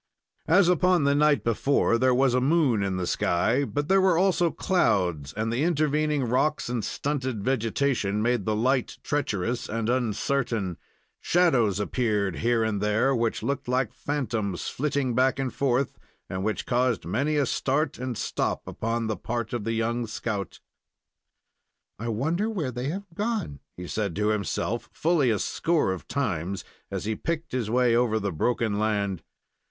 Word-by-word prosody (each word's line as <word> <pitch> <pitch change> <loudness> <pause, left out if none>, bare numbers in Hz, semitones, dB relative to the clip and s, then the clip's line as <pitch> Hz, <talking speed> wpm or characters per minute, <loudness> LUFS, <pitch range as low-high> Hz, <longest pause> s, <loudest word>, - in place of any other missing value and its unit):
As 180 +2 +5
upon 180 -1 +3
the 140 0 +3
night 150 0 +3
before, 115 +1 +2
there 130 0 +3
was 130 -1 +3
a 125 - +2
moon 135 -6 +3
in 95 -1 -1
the 90 - -2
sky, 110 +10 +1
but 145 +1 -2
there 195 +1 +4
were 185 -3 +4
also 175 -2 +3
clouds, 90 - +1
and 110 +5 -2
the 120 - 0
intervening 150 -2 +1
rocks 125 +4 0
and 120 -3 -2
stunted 130 -1 -2
vegetation 115 -3 0
made 120 0 +1
the 110 - +1
light 125 +3 0
treacherous 120 -4 -1
and 115 +1 -2
uncertain. 115 -5 -1 0.4
Shadows 130 - +2
appeared 105 -4 0
here 115 -1 +2
and 105 -3 -1
there, 110 +6 +2
which 115 -1 -1
looked 140 -2 -2
like 125 -2 0
phantoms 115 -10 -2
flitting 140 -2 -1
back 130 +2 +2
and 135 -2 -2
forth, 135 -1 0 0.3
and 95 0 -4
which 110 +1 -2
caused 125 -7 +1
many 140 - 0
a 145 -2 +2
start 140 +2 0
and 125 -2 -3
stop - - -2
upon 115 +1 -2
the 110 -1 -1
part 115 +1 -4
of 115 -4 -3
the 115 - 0
young 115 +1 -1
scout. 105 -3 -4 1.4
"I 115 - -4
wonder 160 - 0
where 170 -12 -2
they 125 +3 -3
have 195 +5 -4
gone?" 210 - -2 0.2
he 90 - -6
said 100 -2 -2
to 105 +2 +1
himself 110 +2 -2
fully 155 -6 +2
a 110 - +2
score 165 - 0
of 95 - -8
times, 100 - -2 0.3
as - - -4
he 110 0 -1
picked 165 +6 -3
his 125 -4 -2
way 120 0 +3
over 120 -2 +2
the 100 -2 -2
broken 110 +4 0
land. 100 -4 0
120 Hz, 165 wpm, -26 LUFS, 110-140 Hz, 1.4 s, As